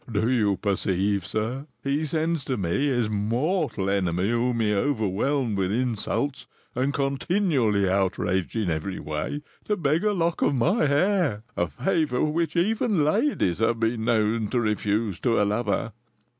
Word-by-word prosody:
"Do 110 Hz, +3 st, +1 dB
you 105 Hz, -6 st, +2 dB
perceive, 100 Hz, -1 st, 0 dB
sir? 115 Hz, +8 st, -3 dB, 0.2 s
He 140 Hz, +3 st, 0 dB
sends 160 Hz, 0 st, -1 dB
to 130 Hz, -, -1 dB
me, 100 Hz, +9 st, 0 dB
his 120 Hz, -5 st, +1 dB
mortal 115 Hz, -, -1 dB
enemy, 95 Hz, 0 st, 0 dB
whom 120 Hz, 0 st, 0 dB
he 105 Hz, -2 st, +2 dB
overwhelmed 110 Hz, +1 st, 0 dB
with 95 Hz, 0 st, 0 dB
insults 125 Hz, +4 st, -1 dB, 0.3 s
and 135 Hz, +2 st, 0 dB
continually 135 Hz, -, +1 dB
outraged 95 Hz, 0 st, 0 dB
in 105 Hz, -6 st, 0 dB
every 80 Hz, +5 st, -3 dB
way, 75 Hz, -, -4 dB, 0.2 s
to 210 Hz, -, 0 dB
beg 155 Hz, +2 st, +1 dB
a 210 Hz, -, +3 dB
lock 170 Hz, -3 st, 0 dB
of 145 Hz, -, +2 dB
my 155 Hz, -, +2 dB
hair, 145 Hz, -, +1 dB
a 85 Hz, -, 0 dB
favour 125 Hz, -, 0 dB
which 160 Hz, +3 st, 0 dB
even 205 Hz, 0 st, +2 dB
ladies 155 Hz, -, +1 dB
have 115 Hz, +1 st, +1 dB
been 115 Hz, 0 st, 0 dB
known 110 Hz, -1 st, +1 dB
to 125 Hz, -, 0 dB
refuse 105 Hz, -2 st, 0 dB
to 115 Hz, -4 st, +1 dB
a 105 Hz, -, +3 dB
lover!" 105 Hz, +1 st, -1 dB
115 Hz, 155 wpm, -25 LUFS, 100-145 Hz, 0.3 s, a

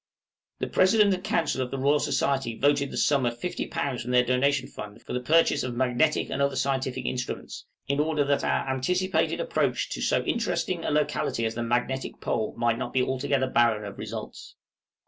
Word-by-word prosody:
} -, -, -67 dB
The -, -, +1 dB
President 200 Hz, +1 st, +4 dB
and 185 Hz, 0 st, -4 dB
Council 165 Hz, -9 st, 0 dB
of 125 Hz, -, -2 dB
the 135 Hz, -, -4 dB
Royal 140 Hz, +3 st, +3 dB
Society 135 Hz, -7 st, 0 dB
voted 140 Hz, 0 st, +2 dB
the -, -, -6 dB
sum 140 Hz, -3 st, +3 dB
of 120 Hz, -1 st, -1 dB
50_l._ 140 Hz, -6 st, -3 dB
from 120 Hz, -, -6 dB
their 125 Hz, 0 st, +4 dB
donation 130 Hz, +2 st, +1 dB
fund 105 Hz, 0 st, -9 dB
for -, -, -7 dB
the 125 Hz, -, 0 dB
purchase 160 Hz, +6 st, +3 dB
of 125 Hz, -1 st, -3 dB
magnetic 130 Hz, +4 st, +1 dB
and 140 Hz, -, -1 dB
other 140 Hz, -1 st, +1 dB
scientific 130 Hz, -1 st, -1 dB
instruments, 125 Hz, -1 st, -4 dB, 0.2 s
in 140 Hz, +1 st, 0 dB
order 150 Hz, -1 st, +1 dB
that 140 Hz, 0 st, +1 dB
our -, -, 0 dB
anticipated 180 Hz, +9 st, 0 dB
approach -, -, 0 dB
to -, -, -4 dB
so -, -, +1 dB
interesting 180 Hz, -6 st, -1 dB
a -, -, -1 dB
locality 150 Hz, -5 st, 0 dB
as 110 Hz, -, -1 dB
the 120 Hz, -, -4 dB
Magnetic 125 Hz, +3 st, -1 dB
Pole 110 Hz, -2 st, -2 dB
might 115 Hz, 0 st, +1 dB
not -, -, -4 dB
be 130 Hz, -, +3 dB
altogether 130 Hz, +1 st, 0 dB
barren 115 Hz, -4 st, +2 dB
of 100 Hz, -, -8 dB
results. -, -, -7 dB
135 Hz, 195 wpm, -26 LUFS, 125-150 Hz, 0.2 s, President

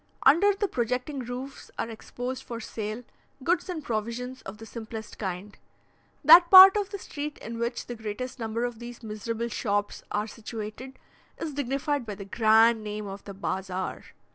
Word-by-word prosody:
Under 340 Hz, +10 st, +6 dB
the 405 Hz, +1 st, -1 dB
projecting 250 Hz, -, -2 dB
roofs 255 Hz, +2 st, -7 dB
are -, -, -2 dB
exposed 245 Hz, +3 st, -6 dB
for 235 Hz, -3 st, -7 dB
sale 220 Hz, +1 st, -5 dB, 0.4 s
goods 350 Hz, +4 st, +1 dB
and 330 Hz, -4 st, -4 dB
provisions 235 Hz, +3 st, -3 dB
of 195 Hz, +2 st, -9 dB
the 225 Hz, -, -10 dB
simplest 220 Hz, -1 st, -8 dB
kind. 195 Hz, 0 st, -5 dB, 0.7 s
That 340 Hz, +4 st, +9 dB
part 380 Hz, +1 st, +11 dB
of 410 Hz, -2 st, 0 dB
the 400 Hz, -, -5 dB
street 295 Hz, -5 st, -6 dB
in 230 Hz, 0 st, -7 dB
which 235 Hz, +1 st, -2 dB
the 245 Hz, -, -6 dB
greatest 240 Hz, +4 st, -6 dB
number 225 Hz, +1 st, -2 dB
of 240 Hz, -2 st, -5 dB
these 240 Hz, 0 st, -9 dB
miserable 225 Hz, +2 st, -4 dB
shops 205 Hz, -3 st, -1 dB
are 210 Hz, +1 st, -1 dB
situated, 225 Hz, +3 st, -7 dB, 0.4 s
is 310 Hz, -3 st, -4 dB
dignified 280 Hz, -1 st, -1 dB
by 205 Hz, -, -4 dB
the 200 Hz, 0 st, -8 dB
grand 220 Hz, +2 st, +4 dB
name 210 Hz, 0 st, -5 dB
of 195 Hz, 0 st, -7 dB
the 200 Hz, -, -8 dB
"Bazaar." 190 Hz, -1 st, -3 dB
235 Hz, 165 wpm, -27 LUFS, 215-270 Hz, 0.7 s, part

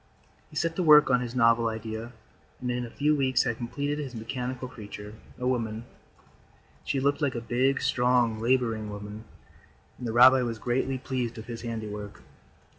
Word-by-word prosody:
He -, -, -15 dB
set 165 Hz, 0 st, 0 dB
to -, -, +1 dB
work 150 Hz, -4 st, +7 dB
on 125 Hz, 0 st, +4 dB
his 120 Hz, 0 st, -5 dB
novel 115 Hz, -1 st, +4 dB
idea 110 Hz, +1 st, -5 dB, 0.5 s
and 125 Hz, 0 st, -2 dB
in 120 Hz, 0 st, -2 dB
a -, -, -11 dB
few 150 Hz, +5 st, +1 dB
weeks 130 Hz, -3 st, +2 dB
had 115 Hz, -, -2 dB
completed 145 Hz, +5 st, -3 dB
his 135 Hz, -4 st, -5 dB
mechanical 125 Hz, +3 st, -4 dB
creature, 105 Hz, -3 st, -9 dB, 0.2 s
a 125 Hz, -, -4 dB
woman. 115 Hz, -3 st, -1 dB, 1.0 s
She 135 Hz, -, -1 dB
looked 140 Hz, +2 st, +1 dB
like 140 Hz, -4 st, 0 dB
a -, -, -1 dB
big, 130 Hz, +4 st, +1 dB
strong, 125 Hz, -3 st, +2 dB
laboring 115 Hz, -3 st, +1 dB
woman, 105 Hz, +1 st, -8 dB, 0.7 s
and 125 Hz, -, -4 dB
the -, -, -2 dB
rabbi 130 Hz, +3 st, +7 dB
was 115 Hz, -2 st, -2 dB
greatly 130 Hz, +3 st, -1 dB
pleased 125 Hz, -2 st, -3 dB
with 110 Hz, -, -8 dB
his 115 Hz, -1 st, -7 dB
handiwork. 105 Hz, -3 st, -6 dB
120 Hz, 175 wpm, -27 LUFS, 115-130 Hz, 1.0 s, work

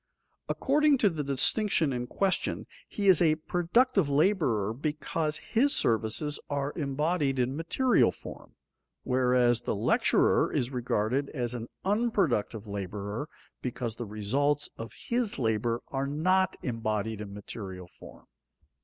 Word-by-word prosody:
According 295 Hz, +1 st, +3 dB
to 210 Hz, -5 st, +3 dB
the 155 Hz, -3 st, -3 dB
distinction 145 Hz, -, +2 dB
in 125 Hz, 0 st, -3 dB
question, 195 Hz, +8 st, -1 dB, 0.2 s
he 205 Hz, -1 st, -2 dB
is 185 Hz, -4 st, +6 dB
a 155 Hz, -2 st, +4 dB
productive 180 Hz, -, +1 dB
laborer 140 Hz, -, +2 dB
because 150 Hz, +3 st, -2 dB
his 275 Hz, +5 st, +1 dB
services 115 Hz, +7 st, 0 dB
are 140 Hz, 0 st, -2 dB
embodied 150 Hz, -1 st, 0 dB
in 125 Hz, +1 st, 0 dB
material 205 Hz, -, +2 dB
form, -, -, -12 dB, 0.5 s
whereas 125 Hz, -2 st, +2 dB
the -, -, -2 dB
lecturer 105 Hz, -, +2 dB
is 125 Hz, +1 st, -1 dB
regarded 125 Hz, +2 st, -1 dB
as 120 Hz, -2 st, -2 dB
an 120 Hz, -1 st, -5 dB, 0.2 s
unproductive 190 Hz, -, 0 dB
laborer 100 Hz, -, -5 dB, 0.3 s
because 120 Hz, -2 st, -4 dB
the 120 Hz, -, -5 dB
results 135 Hz, +8 st, 0 dB
of 115 Hz, 0 st, -7 dB
his 235 Hz, -3 st, -1 dB
labor 115 Hz, -1 st, 0 dB
are 135 Hz, 0 st, -2 dB
not 185 Hz, +6 st, +1 dB
embodied 110 Hz, -2 st, -2 dB
in 100 Hz, -1 st, -7 dB
material 95 Hz, -3 st, -8 dB
form. -, -, -15 dB
135 Hz, 125 wpm, -29 LUFS, 115-170 Hz, 0.5 s, is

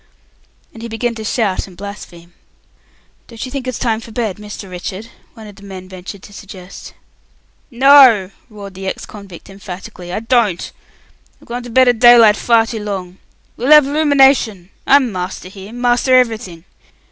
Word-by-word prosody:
And 225 Hz, -, -12 dB
he 235 Hz, -, -6 dB
began 235 Hz, +1 st, -3 dB
to 220 Hz, -1 st, -8 dB
shout 215 Hz, -4 st, -1 dB
and 180 Hz, -2 st, -16 dB
blaspheme. 175 Hz, -4 st, -10 dB, 0.9 s
"Don't 230 Hz, 0 st, -8 dB
you 255 Hz, -, -9 dB
think 265 Hz, -2 st, -5 dB
it's 255 Hz, -, -3 dB
time 225 Hz, -3 st, -1 dB
for 225 Hz, -, -12 dB
bed, 220 Hz, -4 st, -3 dB
Mr. 210 Hz, -1 st, -9 dB
Richard?" 185 Hz, +4 st, -7 dB, 0.3 s
one 220 Hz, -2 st, -12 dB
of 205 Hz, -2 st, -13 dB
the -, -, -16 dB
men 190 Hz, -2 st, -10 dB
ventured 185 Hz, +1 st, -10 dB
to 205 Hz, -, -14 dB
suggest. 190 Hz, -2 st, -12 dB, 0.7 s
"No!" 255 Hz, -7 st, +5 dB, 0.2 s
roared 200 Hz, -3 st, -11 dB
the 190 Hz, +1 st, -8 dB
ex -, -, -5 dB
convict, 200 Hz, -5 st, -12 dB
emphatically, 185 Hz, -2 st, -10 dB
"I 200 Hz, -, -3 dB
don't! 225 Hz, -6 st, 0 dB, 0.7 s
I've -, -, -21 dB
gone 240 Hz, +1 st, -5 dB
to 245 Hz, -, -10 dB
bed 255 Hz, +2 st, +4 dB
at 245 Hz, -2 st, +2 dB
daylight 235 Hz, -3 st, +7 dB
far 230 Hz, +1 st, +2 dB
too 220 Hz, -2 st, -6 dB
long. 190 Hz, -3 st, -6 dB, 0.4 s
We'll 250 Hz, +4 st, -2 dB
have 300 Hz, -2 st, +7 dB
'luminashon! 270 Hz, -, +2 dB, 0.2 s
I'm 270 Hz, -4 st, +4 dB
master 185 Hz, 0 st, -6 dB
here. 195 Hz, +1 st, -12 dB
Master 245 Hz, +1 st, +1 dB
everything. 220 Hz, -9 st, -1 dB
215 Hz, 170 wpm, -16 LUFS, 190-240 Hz, 0.9 s, daylight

